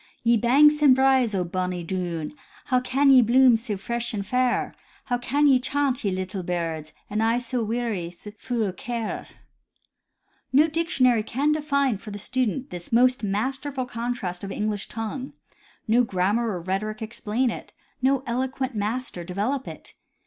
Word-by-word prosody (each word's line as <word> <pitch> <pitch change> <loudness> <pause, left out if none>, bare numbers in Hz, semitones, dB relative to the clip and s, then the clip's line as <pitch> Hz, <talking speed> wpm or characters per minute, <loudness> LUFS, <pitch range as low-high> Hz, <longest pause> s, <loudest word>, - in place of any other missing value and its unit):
" - - -38
Ye 235 0 +4
banks 290 +7 +5
and 275 -4 +7
braes 260 -4 +3
o' 185 - +1
bonny 180 0 -3
Doon, 170 - -3 0.3
How 255 - +2
can 270 +2 +3
ye 260 -2 +8
bloom 245 +1 +5
sae 225 -2 -2
fresh 235 +4 -3
and 200 -1 -3
fair? 250 +3 0 0.3
How 245 -1 -1
can 285 +4 +1
ye 270 -3 +6
chaunt, 275 0 -1
ye 200 - +1
little 185 +1 -3
birds. 165 -3 -3 0.2
An' 210 +1 -2
I 225 +1 +2
sae 245 +1 -3
weary, 225 -6 -2
fu' 215 +6 -5
o' 195 - -1
care? 230 +4 -4 0.6
" - - -46
No 295 +4 +5
dictionary 300 -8 +2
can 270 +7 0
define 280 -7 +1
for 215 - -10
the 205 - -6
student 255 +3 -2
this 175 -1 -8
most 250 +2 +4
masterful 260 +6 -2
contrast 230 -7 -4
of 195 - -5
English 210 0 -2
tongue; 230 +4 -5 0.5
no 235 +3 +4
grammar 210 +3 0
or 180 -5 -3
rhetoric 215 +5 -3
explain 230 +2 -1
it; - - -8 0.3
no 265 0 +2
eloquent 260 +2 -2
master 215 -2 -3
develop 210 +10 -2
it. - - -9
235 Hz, 165 wpm, -25 LUFS, 200-260 Hz, 0.6 s, ye